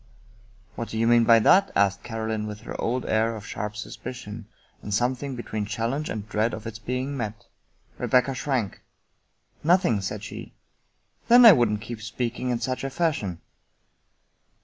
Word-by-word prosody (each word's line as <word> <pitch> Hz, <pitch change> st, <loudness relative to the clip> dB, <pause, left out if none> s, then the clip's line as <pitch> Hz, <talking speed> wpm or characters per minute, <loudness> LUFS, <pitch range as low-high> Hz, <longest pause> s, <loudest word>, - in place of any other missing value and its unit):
" 105 Hz, -1 st, -31 dB
What 115 Hz, -, -4 dB
do 110 Hz, -, -4 dB
you 115 Hz, -, +2 dB
mean 120 Hz, 0 st, +5 dB
by 115 Hz, 0 st, +7 dB
that? 195 Hz, -, +5 dB
" -, -, -28 dB
asked 100 Hz, 0 st, +2 dB
Caroline 110 Hz, -1 st, -3 dB
with 105 Hz, 0 st, -7 dB
her -, -, -7 dB
old 125 Hz, +2 st, -1 dB
air 110 Hz, +1 st, +1 dB
of 105 Hz, -1 st, -9 dB
sharp 105 Hz, -1 st, -5 dB
suspicion, 110 Hz, -1 st, -7 dB, 0.3 s
and 105 Hz, -, -7 dB
something 125 Hz, +5 st, 0 dB
between 110 Hz, -3 st, -4 dB
challenge 115 Hz, +8 st, -2 dB
and 105 Hz, -1 st, -5 dB
dread 110 Hz, +1 st, 0 dB
of 110 Hz, 0 st, -10 dB
its 115 Hz, 0 st, -6 dB
being 130 Hz, +4 st, -3 dB
met. 110 Hz, -4 st, -5 dB, 0.5 s
Rebecca 130 Hz, +1 st, +2 dB
shrank. 130 Hz, -5 st, -2 dB, 0.4 s
" -, -, -40 dB
Nothing," 125 Hz, -, +3 dB
said 95 Hz, -, -4 dB
she. -, -, -9 dB, 0.4 s
" -, -, -41 dB
Then 240 Hz, +1 st, +8 dB
I 225 Hz, -, +12 dB
wouldn't 115 Hz, -, +2 dB
keep 115 Hz, 0 st, -7 dB
speaking 120 Hz, +2 st, -3 dB
in 120 Hz, -1 st, 0 dB
such 130 Hz, +2 st, -3 dB
a 135 Hz, -, -2 dB
fashion." 130 Hz, -, -1 dB
115 Hz, 175 wpm, -25 LUFS, 105-125 Hz, 0.5 s, I